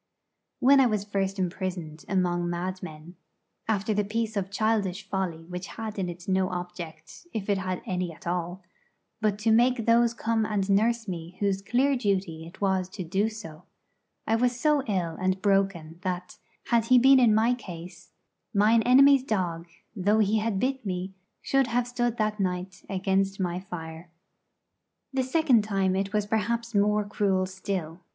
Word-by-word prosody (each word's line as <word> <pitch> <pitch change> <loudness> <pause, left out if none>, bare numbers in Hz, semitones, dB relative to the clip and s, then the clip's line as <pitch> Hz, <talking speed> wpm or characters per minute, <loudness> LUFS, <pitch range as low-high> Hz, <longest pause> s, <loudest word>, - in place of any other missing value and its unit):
When 270 +2 +6
I 265 - +6
was 210 -3 -1
first 195 -1 -2
imprisoned 180 -4 -4
among 175 -2 +1
madmen, 175 -2 -6 0.5
after 215 0 0
the 210 0 +1
piece 220 +2 -2
of 195 -2 -2
childish 200 -2 0
folly 180 -5 -3
which 180 +2 -6
had 220 -2 -5
in 180 -2 -1
it 175 +1 -9
no 190 -1 +1
object, 175 - -8
if 210 -3 -4
it 200 - +1
had 185 -1 -3
any 180 -2 -2
at 165 - -15
all, 175 +2 -3 0.6
but 210 -2 +1
to 220 +2 +1
make 240 +1 +3
those 235 0 +4
come 225 -1 0
and 210 -3 -1
nurse 225 +3 +2
me 170 -1 -6
whose 195 -1 0
clear 260 +7 +2
duty 185 -8 -1
it 170 - -14
was 190 -2 +1
to 190 0 -6
do 195 +6 0
so, 165 -9 -10 0.6
I 225 - +2
was 245 0 +1
so 300 0 +3
ill 175 -6 -1
and 185 +1 +1
broken 190 -5 0
that, 180 -1 -4 0.3
had 235 -2 +3
he 255 +2 +6
been 265 +2 +7
in 230 -4 +5
my 225 +3 +3
case, 180 -6 -9 0.5
Mine 215 +3 +5
enemy's 270 +3 +6
dog, 175 -8 -2 0.3
Though 205 +2 +2
he 215 0 +3
had 210 -2 -1
bit 265 +2 -1
me, 185 -1 -4 0.3
should 270 -2 +2
have 240 +1 0
stood 240 -1 -1
that 215 -1 -1
night 180 -1 -3
Against 195 0 0
my 180 -1 -1
fire. 165 -2 -8 1.0
The 265 - +1
second 260 -4 +3
time 195 -3 0
it 195 +1 -1
was 210 -1 0
perhaps 230 +2 -1
more 210 0 +2
cruel 195 -2 +1
still. 185 -3 -4
195 Hz, 170 wpm, -27 LUFS, 180-225 Hz, 1.0 s, been